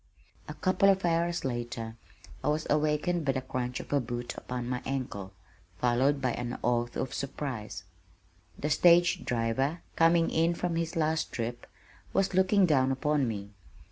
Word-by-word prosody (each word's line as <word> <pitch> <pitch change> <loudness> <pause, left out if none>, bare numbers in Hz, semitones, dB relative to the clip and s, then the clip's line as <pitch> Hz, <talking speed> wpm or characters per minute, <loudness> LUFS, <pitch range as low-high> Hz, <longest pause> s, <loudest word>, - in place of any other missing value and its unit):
A - - -7
couple 190 +1 +3
of 190 -1 +3
hours 170 -1 +1
later 120 -2 -4 0.5
I - - -1
was 150 +1 +1
awakened 155 +3 +1
by 135 -2 +1
the 130 - -2
crunch 125 -1 -3
of - - -6
a 145 - +4
boot 120 -1 -4
upon 125 -1 -5
my 125 0 -2
ankle, 125 -8 -4 0.5
followed 125 +6 +2
by 130 -2 0
an 120 +1 -4
oath 120 0 0
of 130 - -3
surprise. 125 -8 -4 0.7
The 150 - -2
stage 175 +3 +5
driver, 125 +7 0
coming 165 0 +4
in 165 +1 +2
from 175 -1 -2
his 165 0 -2
last 160 0 0
trip, 120 +1 -4 0.5
was 195 0 +1
looking 190 +1 +4
down 135 -5 +3
upon 140 0 +1
me. 100 -2 -5
135 Hz, 160 wpm, -29 LUFS, 120-165 Hz, 0.7 s, stage